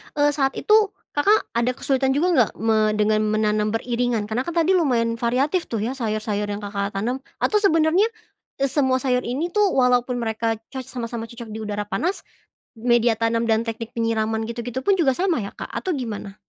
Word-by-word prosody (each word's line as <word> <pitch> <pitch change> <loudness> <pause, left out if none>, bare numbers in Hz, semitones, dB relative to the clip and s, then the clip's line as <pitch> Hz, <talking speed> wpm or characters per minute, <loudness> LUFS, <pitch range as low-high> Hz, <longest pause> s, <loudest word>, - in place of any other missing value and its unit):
eee 290 0 +3
saat 270 -2 0
itu, 425 -1 +3 0.2
Kakak, 405 +9 +2
ada 235 +2 +1
kesulitan 265 -1 +1
juga 335 +5 +2
nggak 240 -4 +4
me 215 -1 +2
dengan 215 0 +2
menanam 215 0 +1
beriringan? 235 -2 -1
Karena 245 +4 -1
kan 340 - -3
tadi 335 +2 +3
lumayan 230 -7 +1
variatif 270 +9 +1
tuh 225 -3 -3
ya 240 - -1
sayur-sayur 215 -3 -2
yang, 205 0 -4
Kakak, 200 0 -3
tanam. 240 +6 -1 0.2
Atau 420 - +3
sebenarnya, 335 +2 +3 0.5
eee, 275 - +2
semua 265 -3 +2
sayur 250 -1 +1
ini 305 +8 -2
tuh 420 0 +3
walaupun 250 -1 +3
mereka 225 0 -1 0.2
coc 260 -2 -6
sama-sama 230 -2 -5
cocok 235 -1 -10
di 220 - -6
udara 210 0 -3
panas, 355 - -2 0.5
media 240 0 +3
tanam 230 0 +1
dan 220 +1 +3
teknik 225 0 -4
penyiraman 225 -1 0
gitu-gitu 240 +2 -4
pun 400 - +5
juga 275 -5 +4
sama 355 - +1
ya, 200 - -6
Kak, - - -6
atau 370 - -2
gimana? 210 -5 -6
240 Hz, 185 wpm, -23 LUFS, 220-275 Hz, 0.5 s, pun